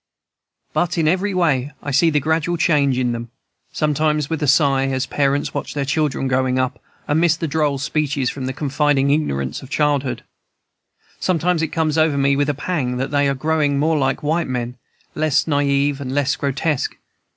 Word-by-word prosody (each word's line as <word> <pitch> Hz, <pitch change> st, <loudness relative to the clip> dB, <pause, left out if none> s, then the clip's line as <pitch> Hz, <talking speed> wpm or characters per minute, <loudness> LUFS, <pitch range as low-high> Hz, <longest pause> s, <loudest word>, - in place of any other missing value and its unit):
"But 175 Hz, 0 st, 0 dB
in 160 Hz, -2 st, +2 dB
every 185 Hz, +5 st, +1 dB
way 150 Hz, -7 st, +1 dB
I 145 Hz, -, -3 dB
see 150 Hz, +5 st, +4 dB
the 150 Hz, -2 st, +2 dB
gradual 160 Hz, +3 st, 0 dB
change 145 Hz, -5 st, +2 dB
in 125 Hz, -1 st, +1 dB
them, 120 Hz, 0 st, -5 dB, 0.4 s
sometimes 150 Hz, 0 st, 0 dB
with 160 Hz, -, -2 dB
a 150 Hz, -, 0 dB
sigh, 135 Hz, -1 st, +3 dB
as 130 Hz, 0 st, -1 dB
parents 140 Hz, 0 st, 0 dB
watch -, -, -4 dB
their 140 Hz, -1 st, -1 dB
children 140 Hz, -1 st, 0 dB
growing 130 Hz, 0 st, +1 dB
up 130 Hz, -1 st, -1 dB, 0.3 s
and 150 Hz, +2 st, +2 dB
miss 170 Hz, -1 st, +4 dB
the 165 Hz, -, -2 dB
droll 145 Hz, -1 st, 0 dB
speeches 140 Hz, -2 st, -1 dB
and 130 Hz, -2 st, -4 dB
the -, -, -1 dB
confiding 140 Hz, 0 st, +1 dB
ignorance 70 Hz, -, -1 dB
of 130 Hz, -, -12 dB
childhood. 145 Hz, -3 st, 0 dB, 1.0 s
Sometimes 180 Hz, -1 st, +1 dB
it 160 Hz, -, +1 dB
comes 160 Hz, 0 st, 0 dB
over 155 Hz, -2 st, +2 dB
me 140 Hz, 0 st, +3 dB
with 145 Hz, +1 st, +1 dB
a 145 Hz, -, 0 dB
pang 140 Hz, -5 st, -2 dB
that 135 Hz, +2 st, -3 dB
they 145 Hz, -1 st, +2 dB
are 140 Hz, -, 0 dB
growing 150 Hz, 0 st, +1 dB
more 155 Hz, +3 st, +2 dB
like 135 Hz, -2 st, 0 dB
white 160 Hz, +3 st, 0 dB
men, 125 Hz, -1 st, -3 dB, 0.4 s
less 155 Hz, -2 st, +1 dB
naive 140 Hz, -1 st, +1 dB
and 130 Hz, -1 st, -4 dB
less 145 Hz, -1 st, +1 dB
grotesque. 140 Hz, +1 st, -1 dB
145 Hz, 185 wpm, -20 LUFS, 135-155 Hz, 1.0 s, see